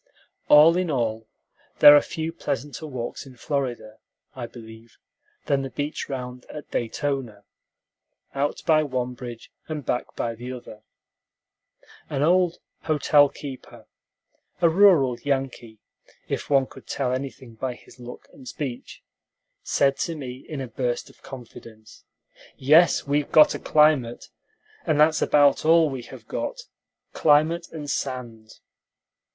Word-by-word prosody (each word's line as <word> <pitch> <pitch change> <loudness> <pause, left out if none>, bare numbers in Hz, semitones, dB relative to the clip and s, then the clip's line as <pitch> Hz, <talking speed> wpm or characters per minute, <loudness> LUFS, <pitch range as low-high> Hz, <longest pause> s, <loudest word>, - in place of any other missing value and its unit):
All 155 +3 +7
in 180 -2 -1
all, 115 -5 -2 0.5
there 145 - +10
are 145 - +6
few 160 0 -5
pleasanter 145 +3 -5
walks 130 -1 -6
in 130 - -14
Florida, 120 -6 -4 0.3
I 125 -3 -6
believe, 115 -1 -14 0.5
than 140 -1 +1
the 135 - -5
beach 145 +3 -4
round 125 -2 -6
at 150 - -10
Daytona, 120 -3 -3 0.9
out 140 +1 -2
by 155 -2 +4
one 130 -4 -3
bridge 120 -2 -10 0.2
and 150 -4 -5
back 125 - -3
by 115 - -2
the 120 +3 -7
other. 115 -3 -11 1.3
An 140 -1 -1
old 180 +1 +3 0.3
hotel 150 -2 +4
keeper 135 -1 -10 0.7
a 170 - +4
rural 160 -9 +4
Yankee, 135 -5 -3 0.5
if - - -4
one 135 -2 +4
could - - -15
tell 125 -3 -2
anything 130 -2 -6
by 125 +2 -4
his 125 - -19
look 125 0 -11
and 130 -2 -14
speech 130 -5 -7 0.6
said 135 -1 +1
to 165 - -2
me 130 -3 -8
in 150 -4 -5
a 130 - -5
burst 120 +1 -3
of - - -27
confidence, 115 -4 -13 0.5
"Yes, 155 +6 +4
we've 145 0 -1
got 155 -1 +6
a - - -5
climate, 150 -6 +2 0.5
and 155 -3 0
that's 155 +1 +4
about 145 -1 +4
all 160 -1 +4
we 130 -2 -5
have 120 - -13
got, - - -4 0.5
climate 160 +3 +3
and 150 -3 -7
sand." 120 -6 -5
135 Hz, 135 wpm, -24 LUFS, 125-150 Hz, 1.3 s, there